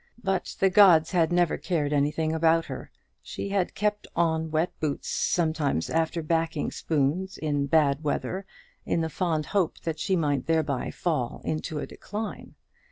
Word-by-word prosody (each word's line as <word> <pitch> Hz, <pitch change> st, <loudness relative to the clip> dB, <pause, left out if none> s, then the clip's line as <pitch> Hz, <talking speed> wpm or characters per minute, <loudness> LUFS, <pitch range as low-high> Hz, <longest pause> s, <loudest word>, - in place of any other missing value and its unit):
But 190 Hz, -2 st, -1 dB
the 195 Hz, -1 st, +4 dB
gods 175 Hz, -5 st, +6 dB
had 175 Hz, -2 st, +2 dB
never 175 Hz, -2 st, +2 dB
cared 150 Hz, -5 st, -1 dB
anything 150 Hz, +2 st, +1 dB
about 165 Hz, 0 st, +3 dB
her. -, -, -7 dB, 0.3 s
She -, -, -6 dB
had 195 Hz, -2 st, 0 dB
kept 210 Hz, 0 st, -1 dB
on 160 Hz, -1 st, +1 dB
wet 160 Hz, +3 st, 0 dB
boots 150 Hz, -3 st, -2 dB
sometimes 155 Hz, -, 0 dB
after 165 Hz, 0 st, 0 dB
"backing" 165 Hz, -1 st, 0 dB
spoons 160 Hz, +5 st, -1 dB
in 145 Hz, -2 st, -1 dB
bad 150 Hz, -1 st, +3 dB
weather, 185 Hz, +6 st, -2 dB, 0.4 s
in 165 Hz, -, 0 dB
the 160 Hz, -, -1 dB
fond 160 Hz, -4 st, -1 dB
hope 195 Hz, -5 st, 0 dB
that 160 Hz, -1 st, -3 dB
she 190 Hz, +4 st, +1 dB
might 145 Hz, -6 st, 0 dB
thereby 155 Hz, -5 st, 0 dB
fall 150 Hz, -9 st, -2 dB
into 155 Hz, 0 st, -3 dB
a 145 Hz, -, -3 dB
decline. 210 Hz, +2 st, -7 dB
160 Hz, 160 wpm, -27 LUFS, 150-175 Hz, 0.4 s, gods